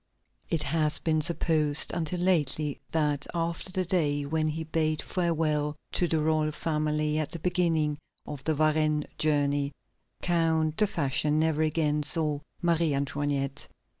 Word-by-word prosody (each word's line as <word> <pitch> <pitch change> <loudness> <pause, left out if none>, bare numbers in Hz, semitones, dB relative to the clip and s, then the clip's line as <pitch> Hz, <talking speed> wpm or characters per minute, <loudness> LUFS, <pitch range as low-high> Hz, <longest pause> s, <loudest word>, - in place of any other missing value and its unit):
It 160 -3 0
has 155 0 +1
been 155 -1 0
supposed 155 -2 +4
until 175 +1 -2
lately 150 -5 +1
that 150 -3 0
after 170 +2 -2
the 185 -1 -1
day 145 -5 +1
when 155 +2 0
he 160 +1 -3
bade 155 -1 -1
farewell 155 -4 0 0.2
to 175 - +2
the 160 - +1
royal 155 0 +1
family 150 -1 -1
at 155 - -2
the - - -3
beginning 165 -4 0 0.3
of 145 -2 -7
the 160 - +1
Varennes 155 0 +1
journey, 145 -2 +1 0.5
Count 160 -2 +1
de 210 - +3
Fersen 150 -4 0
never 160 -1 +1
again 155 -1 +1
saw 150 0 +1 0.2
Marie 165 -3 +2
Antoinette. 140 0 -2
155 Hz, 140 wpm, -28 LUFS, 150-165 Hz, 0.5 s, supposed